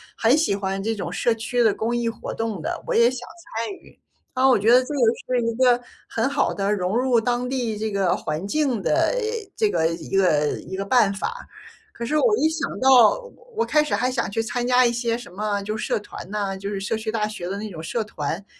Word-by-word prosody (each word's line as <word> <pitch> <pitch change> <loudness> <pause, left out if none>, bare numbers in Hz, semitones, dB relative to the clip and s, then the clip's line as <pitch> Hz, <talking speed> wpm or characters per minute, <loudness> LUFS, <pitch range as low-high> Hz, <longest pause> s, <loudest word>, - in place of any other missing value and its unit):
很 235 +6 +3
喜 310 -11 +2
欢 195 -1 -3
这 225 +3 -1
种 180 -5 -5
社 225 +6 +1
区 225 +2 -1
的 220 -3 +4
公 225 +2 -2
益 235 -1 -1
活 230 - -4
动 225 -6 -3
的， - - -4
我 - - 0
也 235 +1 +5
想 245 -1 -7 0.3
参 230 - -2
与。 - - -17 0.3
啊， 260 0 +3
我 260 - +5
觉 210 +2 +2
得 250 +1 +7
这 275 - -6
个 285 - -2 0.4
是 245 - +2
一 230 - 0
个 245 0 +4 0.3
很 225 +3 0
好 280 0 +1
的， 200 0 -1
融 185 0 -1
入 250 -1 +3
当 245 +2 -1
地 245 -4 -1
这 215 +1 -2
个 195 -3 +1
环 160 +6 -4
境 265 -2 0
的， 320 +8 +2 0.4
这 430 -2 +2
个 160 - +1
一 165 +3 -4
个 155 -6 +3
一 190 - -7
个 195 - -3
办 210 -2 +3
法。 475 - -5 0.5
可 235 - -5
是 300 +6 0
我 430 +5 +3
一 315 - +3
想 320 -2 -2
到 265 - +6 0.3
我 460 +2 +1
开 305 - +3
始 300 - 0
还 250 +1 0
想 245 -5 -1
去 225 +3 -1
参 240 +2 -2
加 250 0 +5
一 240 - +3
些 235 -1 -1
什 240 -6 -11
么 205 +1 -2
就 215 +2 -3
是 - - -3
社 - - 0
团 205 - -10
呐， 200 -2 -2
就 195 +1 -5
是 205 - -3
社 200 +3 -2
区 220 0 -4
大 220 -1 0
学 210 -5 -5
的 195 - -3
那 215 +1 -5
种 165 -3 -7
社 220 +8 -2
团。 165 -1 -4
225 Hz, 260 characters per minute, -23 LUFS, 200-250 Hz, 0.5 s, 得